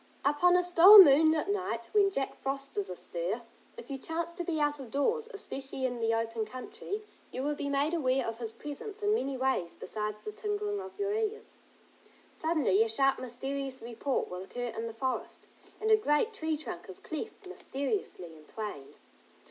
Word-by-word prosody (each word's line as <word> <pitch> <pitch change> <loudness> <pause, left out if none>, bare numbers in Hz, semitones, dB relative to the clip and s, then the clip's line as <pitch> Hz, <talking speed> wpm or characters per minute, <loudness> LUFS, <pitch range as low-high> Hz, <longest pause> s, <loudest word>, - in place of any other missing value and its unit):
Upon 295 +5 +4
a 360 - +4
still 355 +4 +9
moonlit 315 -2 +8
night, 235 - -2
when 410 -2 +5
Jack 275 -8 -2
Frost 275 +1 -4
is 200 -2 -1
astir, 180 +5 -3 0.3
if 470 - -9
you 270 - -4
chance 330 +3 -3
to 350 +1 -5
be 330 -2 -1
out 295 0 +1
of 260 -4 -8
doors, 445 - 0
especially 270 -9 -4
in 245 -2 -2
the 225 0 +1
open 225 0 -1
country, 410 - -6 0.3
you 260 - -4
will 295 +1 0
be 285 -1 -3
made 280 +3 +1
aware 265 -5 +1
of 230 0 -4
his 225 -2 -4
presence 400 - -8
in 415 +1 +3
many 275 -9 -1
ways 255 -10 0
besides 210 +1 -4
the 425 - -3
tingling 415 -1 -2
of 380 0 -10
your 405 0 -1
ears. 440 0 -3 0.7
Suddenly 310 - +2
a 225 - +4
sharp 270 +4 +2
mysterious 265 +2 -4
report 240 +4 -2
will 180 0 -6
occur 245 +5 -5
in 225 +1 -3
the 225 - -6
forest, 260 +2 -3 0.3
and 435 +1 +1
a - - +9
great 425 +2 +1
tree 315 -6 -2
trunk 190 - -7
is 185 - -7
cleft 355 +5 -7
mysteriously 275 - -3
in 155 -1 -16
twain. 205 -9 -7
280 Hz, 185 wpm, -30 LUFS, 235-375 Hz, 0.7 s, still